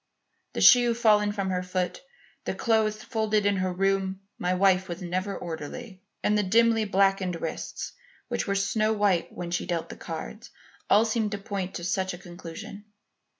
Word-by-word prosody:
The - - -2
shoe 240 -2 +7
fallen 210 -3 +4
from 195 -2 -2
her 180 0 0
foot, 180 - -2 0.4
the - - -2
clothes 220 -2 +2
found 215 - -14
folded 215 -3 +1
in 205 -1 +3
her 185 0 0
room 195 +1 0 0.2
(my 180 - 0
wife 190 0 +3
was 175 0 -4
never 185 +3 -2
orderly), 180 +5 -7 0.2
and 210 - +3
the 210 - +3
dimly 225 +3 +3
blackened 195 -3 +2
wrists 165 - -5 0.4
which - - -2
were 200 - 0
snow 215 +2 +1
white 205 -5 +1
when 175 -1 -6
she 175 - -1
dealt 170 -2 -2
the - - -7
cards - - -7 0.4
all 215 +3 +6
seemed 220 -2 0
to - - -1
point 195 -2 -4
to 175 - -5
such 185 +1 -1
a - - -10
conclusion. 175 +3 -9
195 Hz, 180 wpm, -27 LUFS, 180-215 Hz, 0.4 s, shoe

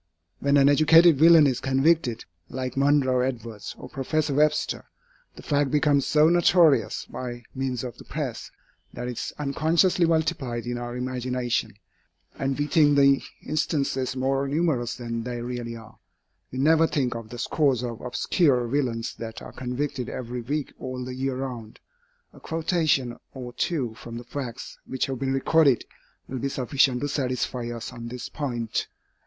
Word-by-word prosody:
When 140 0 +3
an 140 0 +6
educated 155 +2 +6
villain 165 -1 +8
is 130 -3 +1
convicted, 135 -2 +1 0.2
like 130 0 -4
Monroe 135 -2 +3
Edwards 115 -5 -4
or - - -9
Professor 145 +2 -1
Webster, 150 +2 +1 0.5
the - - -12
fact 145 -1 +1
becomes 145 -2 +2
so 150 0 +5
notorious 165 - +4
by 120 -1 -6
means 130 -2 -2
of 125 -3 -7
the - - -10
press, - - -5 0.4
that 120 0 -5
it - - -2
is - - -4
unconsciously 160 +5 +2
multiplied 135 -7 0
in 120 0 -3
our 120 0 -5
imagination, 125 -3 -2 0.6
and 135 0 -2
we 145 - 0
think 150 -2 +4
the 140 -1 +5 0.2
instances 140 -4 -1
more 135 +1 0
numerous 140 -5 0
than 115 -2 -4
they 120 +1 -4
really 120 -1 -5
are. 115 -1 -13 0.5
We 130 - -6
never 160 +4 +4
think 130 -6 0
of 115 -2 -7
the 120 - -8
scores 135 -1 +1
of 120 -2 -5
obscure 125 +1 +1
villains 120 -3 -1
that 115 -1 -6
are - - -9
convicted 130 0 -3
every 125 0 -5
week 145 +4 -3
all 130 -1 -5
the 130 - -6
year 130 0 -2
round. 125 -5 -6 0.5
A - - -15
quotation 160 -7 0 0.2
or 125 -2 -7
two 125 -3 -1
from 115 +1 -9
the 120 - -7
facts 120 -1 -7
which 130 - -1
have 135 -2 -4
been 135 0 -1
recorded, 140 -1 +3 0.4
will 130 - -4
be 140 - -1
sufficient 130 -1 +1
to 145 - 0
satisfy 125 -3 -2
us 120 +1 -6
on 115 -1 -7
this 120 0 -6
point. 120 -6 -3
130 Hz, 160 wpm, -25 LUFS, 120-145 Hz, 0.6 s, villain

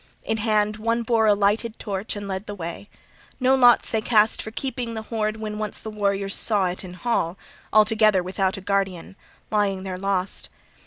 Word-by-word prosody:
In 220 - -1
hand 215 -1 +1
one 230 +2 0
bore 225 -1 +2
a 205 - +5
lighted 210 +3 +1
torch 200 0 -4
and 205 -1 -6
led 190 +2 -4
the 205 - -5
way. 170 +2 -7 0.5
No 260 0 +3
lots 245 -2 +5
they 220 - +1
cast 215 -1 +3
for - - -6
keeping 240 -1 -4
the 220 - -4
hoard 220 -1 -2
when 215 -1 -5
once 215 -2 -1
the 220 - -7
warriors 200 -1 -1
saw 205 -4 +2
it 180 +1 -3
in 180 -1 -9
hall, 185 -5 -1 0.3
altogether 215 -3 +4
without 190 +2 -1
a - - -7
guardian, 195 -2 -2 0.4
lying 200 -3 +1
there 185 -1 -5
lost. 195 -1 -1
210 Hz, 190 wpm, -24 LUFS, 195-220 Hz, 0.5 s, a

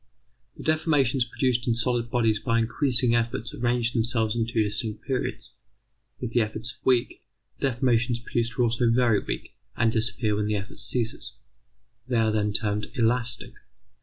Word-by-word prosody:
The - - -9
deformations 145 -5 +2
produced 125 -1 0
in 115 - +2
solid 120 0 +1
bodies 115 -4 +2
by 115 0 0
increasing 120 +1 +2
efforts 115 0 -1
arrange 120 -1 +1
themselves 115 -1 +1
in 115 -1 0
two 115 -2 +1
distinct 105 +1 -3
periods. 130 -2 -3 0.7
If 125 -3 -4
the 120 - +3
efforts 110 +2 -3
are - - -26
weak, 125 -2 +1 0.4
the - - +2
deformations 125 -1 +1
produced 120 0 -2
are 125 - +3
also 115 0 +2
very 115 -3 +3
weak - - -5 0.2
and 115 0 +3
disappear 110 -1 0
when 105 0 -1
the 105 - 0
effort 100 0 -6
ceases. 115 -3 -1 0.7
They 125 -2 0
are 110 -1 +3
then 105 -1 +1
termed 105 0 -1
elastic. 120 0 0
115 Hz, 165 wpm, -26 LUFS, 110-125 Hz, 0.7 s, the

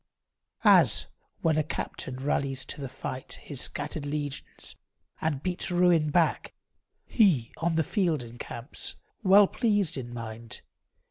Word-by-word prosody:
As - - +6 0.4
when 160 -2 +2
a - - +2
captain 130 -3 -4
rallies 135 0 -1
to - - -6
the 135 - -4
fight 130 0 -5
His 140 -4 -7
scattered 145 +1 -3
legions, 145 -1 -4 0.5
and 145 -3 -1
beats 180 +1 0
ruin 175 -3 +4
back, 165 +2 +1 0.5
He, 170 - +3
on 165 +1 0
the 160 - +3
field, 165 - 0
encamps, 120 +2 -6 0.3
well 200 0 +7
pleased 205 - +1
in 120 -2 -5
mind. 115 -1 -7
150 Hz, 130 wpm, -28 LUFS, 130-175 Hz, 0.5 s, well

